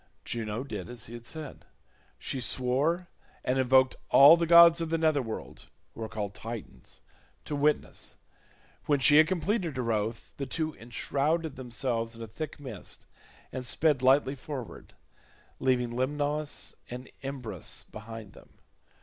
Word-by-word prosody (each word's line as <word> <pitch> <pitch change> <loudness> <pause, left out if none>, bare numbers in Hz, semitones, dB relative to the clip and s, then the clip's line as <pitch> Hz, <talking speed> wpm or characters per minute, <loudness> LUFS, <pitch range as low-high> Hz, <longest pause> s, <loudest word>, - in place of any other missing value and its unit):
Juno 115 0 -3
did 105 -8 -6
as 120 -2 -5
he 115 - -10
had 120 0 -9
said. 155 -3 -7 0.5
She 130 - -4
swore, 140 +9 +2 0.4
and 130 +1 +1
invoked 130 0 +4
all 145 +4 +9
the 170 -1 -1
gods 170 0 +8
of 165 - -2
the 165 - +1
nether 155 -3 +2
world, 115 -3 -7 0.3
who - - -10
are 110 - -4
called 105 -2 -4
Titans, 105 - -9 0.4
to 150 - -3
witness. 150 +1 -1 0.7
When 145 -2 +3
she 145 +3 +6
had 155 0 +7
completed 185 - -1
her 120 -2 -1
oath, 110 +2 -3
the 140 - -4
two 160 -1 -2
enshrouded 145 +6 -1
themselves 120 -2 -2
in 115 - -8
a - - -7
thick 150 +8 -6
mist 125 -9 -9 0.5
and 130 - -5
sped 145 +2 +2
lightly 135 +1 +4
forward, 135 -3 -8 0.6
leaving 125 -2 +1
Lemnos 145 +4 -2 0.2
and 125 +1 -7
Imbrus 125 - -5
behind 110 -1 -9
them. - - -18
130 Hz, 150 wpm, -29 LUFS, 115-150 Hz, 0.7 s, all